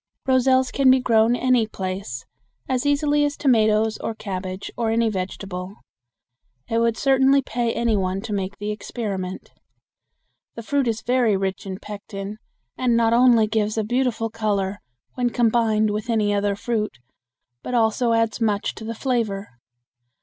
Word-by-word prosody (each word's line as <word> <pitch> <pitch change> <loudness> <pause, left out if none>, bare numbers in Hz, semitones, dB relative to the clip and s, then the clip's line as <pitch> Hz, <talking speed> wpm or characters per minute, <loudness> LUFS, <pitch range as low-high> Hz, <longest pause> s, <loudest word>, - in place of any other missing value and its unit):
Roselles 260 0 +3
can 275 -2 +3
be 260 0 +6
grown 230 -1 +3
any 250 -3 +2
place 185 - -5 0.4
as 260 +2 0
easily 290 +1 +2
as 290 0 -1
tomatoes 220 -4 +2
or 225 - -4
cabbage 185 -2 -5
or 230 -2 -1
any 230 0 +2
vegetable. 185 0 -5 0.9
It 230 - 0
would 230 -1 +1
certainly 270 0 +4
pay 235 -1 -1
any 235 -2 +1
one 190 -1 -1
to 215 0 -5
make 195 0 -3
the 205 +1 -3
experiment. 200 -4 -5 1.0
The 230 - -7
fruit 280 +2 0
is 220 -1 -2
very 245 -5 +2
rich 190 0 -3
in 190 -1 -4
pectin, 205 0 -7 0.4
and 245 -2 +1
not 230 0 +3
only 240 -2 +5
gives 215 0 -1
a 220 - +1
beautiful 235 -1 -1
color 205 -3 -1 0.3
when 245 -1 0
combined 225 -3 +2
with 215 +3 -4
any 215 -3 +2
other 200 0 0
fruit, 215 - -2 0.6
but 250 - -4
also 230 +1 +2
adds 230 0 0
much 210 -2 0
to - - -10
the 230 +1 -5
flavor. 220 -6 -1
225 Hz, 155 wpm, -23 LUFS, 205-245 Hz, 1.0 s, be